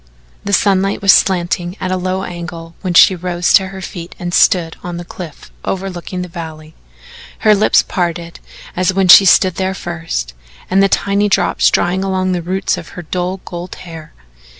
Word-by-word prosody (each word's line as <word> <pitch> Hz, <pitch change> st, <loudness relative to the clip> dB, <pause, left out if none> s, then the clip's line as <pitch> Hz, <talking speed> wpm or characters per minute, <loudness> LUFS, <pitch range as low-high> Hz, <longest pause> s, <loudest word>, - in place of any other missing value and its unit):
The 200 Hz, -, -4 dB
sunlight 195 Hz, 0 st, +2 dB
was 195 Hz, -, +7 dB
slanting 175 Hz, 0 st, 0 dB
at 185 Hz, -1 st, -3 dB
a -, -, +1 dB
low 185 Hz, +1 st, -2 dB
angle 170 Hz, -2 st, -8 dB
when 180 Hz, -3 st, -3 dB
she 190 Hz, -, +7 dB
rose 175 Hz, 0 st, -1 dB
to 190 Hz, -, +5 dB
her 190 Hz, 0 st, -9 dB
feet 175 Hz, -1 st, -8 dB
and 175 Hz, -1 st, -5 dB
stood 175 Hz, -5 st, +3 dB
on 175 Hz, -1 st, -6 dB
the 175 Hz, -, -7 dB
cliff 170 Hz, -4 st, -10 dB
overlooking 185 Hz, -1 st, -4 dB
the -, -, -7 dB
valley 160 Hz, -3 st, -9 dB, 0.7 s
her 215 Hz, -, +5 dB
lips 210 Hz, +1 st, +3 dB
parted 170 Hz, -2 st, -3 dB, 0.4 s
as 185 Hz, +1 st, 0 dB
when 195 Hz, -1 st, +2 dB
she 195 Hz, -, +10 dB
stood 185 Hz, -1 st, +4 dB
there 190 Hz, 0 st, -1 dB
first, 165 Hz, -, -5 dB, 0.4 s
and 195 Hz, +1 st, +4 dB
the 195 Hz, -, +3 dB
tiny 200 Hz, +1 st, +1 dB
drops -, -, +2 dB
drying 180 Hz, +2 st, 0 dB
along 185 Hz, -1 st, -1 dB
the 180 Hz, -1 st, -1 dB
roots 190 Hz, +3 st, -2 dB
of -, -, -11 dB
her 175 Hz, -, -6 dB
dull 180 Hz, +3 st, -3 dB
gold 175 Hz, +1 st, -7 dB
hair. 165 Hz, -3 st, -11 dB
180 Hz, 180 wpm, -16 LUFS, 175-190 Hz, 0.7 s, she